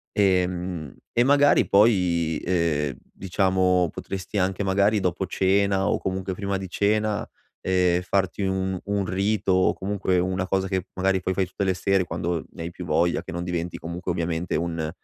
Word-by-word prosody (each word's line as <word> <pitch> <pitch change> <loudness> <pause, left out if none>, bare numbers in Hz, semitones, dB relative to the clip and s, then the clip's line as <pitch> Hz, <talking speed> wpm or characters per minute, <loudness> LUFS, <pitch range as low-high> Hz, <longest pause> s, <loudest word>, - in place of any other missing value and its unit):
Ehm, 90 -5 0 0.2
e 120 - +3
magari 145 +2 +4
poi, 90 -7 +3
ehm, 80 -6 0
diciamo, 95 -2 +1
potresti 95 +2 -5
anche 95 +1 0
magari, 100 +2 +2
dopo 90 0 -1
cena 95 +1 +2
o - - +2
comunque 95 0 -3
prima 100 0 -2
di 95 -1 -6
cena, 105 +2 0 0.3
ehm, 90 -1 +2
farti 95 +1 0
un 95 0 -1
un 100 -1 -1
rito 100 +1 0
o 95 0 +3
comunque 95 -2 -1
una 95 +1 -1
cosa 95 0 0
che 95 -1 -2
magari 95 0 +1
poi 95 +1 -2
fai 95 0 0
tutte 95 - -4
le 95 -1 +2
sere, 95 +1 +1
quando 85 0 -3
ne - - -10
hai 85 - -4
più 90 +1 -8
voglia, 85 +1 +1
che - - -8
non 85 +1 -4
diventi 90 -1 -3
comunque 85 +2 -4
ovviamente 85 0 -2
un 80 -1 -2
95 Hz, 170 wpm, -24 LUFS, 85-95 Hz, 0.3 s, magari